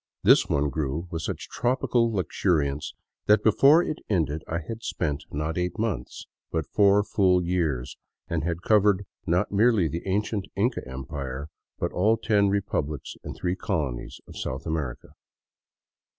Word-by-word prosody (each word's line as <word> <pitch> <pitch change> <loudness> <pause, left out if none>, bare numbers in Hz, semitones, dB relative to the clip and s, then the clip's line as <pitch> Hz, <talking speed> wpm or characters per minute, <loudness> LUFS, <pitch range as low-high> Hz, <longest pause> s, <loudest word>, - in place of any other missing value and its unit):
This - - +6
one 70 0 +1
grew 75 +4 -2
with 80 -2 -3
such - - -4
tropical 120 -1 +1
luxuriance 80 -7 0 0.3
that 105 +1 +5
before 140 - +6
it 155 - -3
ended 80 -6 0
I 85 - -2
had 115 0 -5
spent, 75 -9 -2
not 75 +4 -2
eight 90 +4 -2
months, 110 -3 -3 0.3
but 80 -2 -1
four 100 0 +4
full 95 -3 +3
years, 80 -8 -1 0.3
and 80 -2 -1
had 85 +2 -2
covered 105 -2 +3 0.2
not 90 +5 +1
merely 105 -3 +4
the 85 +3 -4
ancient 100 +1 -1
Inca 115 +7 +1
Empire, 65 +2 -5 0.3
but - - -2
all 105 +5 +3
the 115 - -13
ten 100 -3 +4
republics 90 -8 -2
and - - -6
three 90 0 -1
colonies 70 -9 -3
of - - -12
South 65 +2 -4
America. 75 -7 -3
90 Hz, 150 wpm, -26 LUFS, 75-105 Hz, 0.3 s, This